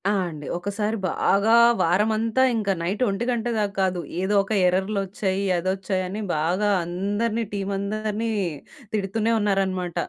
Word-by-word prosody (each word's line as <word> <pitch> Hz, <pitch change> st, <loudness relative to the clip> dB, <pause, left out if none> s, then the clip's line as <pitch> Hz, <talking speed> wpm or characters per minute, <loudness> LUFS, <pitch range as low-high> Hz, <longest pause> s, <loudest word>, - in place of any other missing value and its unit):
ఆ! -, -, +3 dB, 0.2 s
అండి. 155 Hz, -3 st, -8 dB
ఒకసారి 210 Hz, +4 st, -2 dB
బాగా 205 Hz, +6 st, +3 dB, 0.3 s
వారమంతా 220 Hz, +7 st, +2 dB
ఇంక 215 Hz, -3 st, -1 dB
నైట్ 185 Hz, +7 st, -2 dB
ఒంటి 200 Hz, +4 st, -1 dB
గంట 235 Hz, -2 st, -2 dB
దాకా 205 Hz, -2 st, 0 dB
గాదు. 185 Hz, -2 st, +1 dB, 0.2 s
ఏదోక 195 Hz, 0 st, +1 dB, 0.2 s
ఎర్రర్లొచ్చాయి 195 Hz, +1 st, -1 dB
అదోచ్చాయని 190 Hz, +2 st, -2 dB, 0.2 s
బాగా 180 Hz, +7 st, +1 dB, 0.2 s
అందరిని 205 Hz, +6 st, -1 dB
టీమ్ 200 Hz, -1 st, -3 dB
అందరిని 215 Hz, +2 st, -2 dB, 0.6 s
తిడుతూనే 215 Hz, +2 st, 0 dB
ఉన్నారనమాట. 190 Hz, -4 st, 0 dB
200 Hz, 120 wpm, -24 LUFS, 185-215 Hz, 0.6 s, ఆ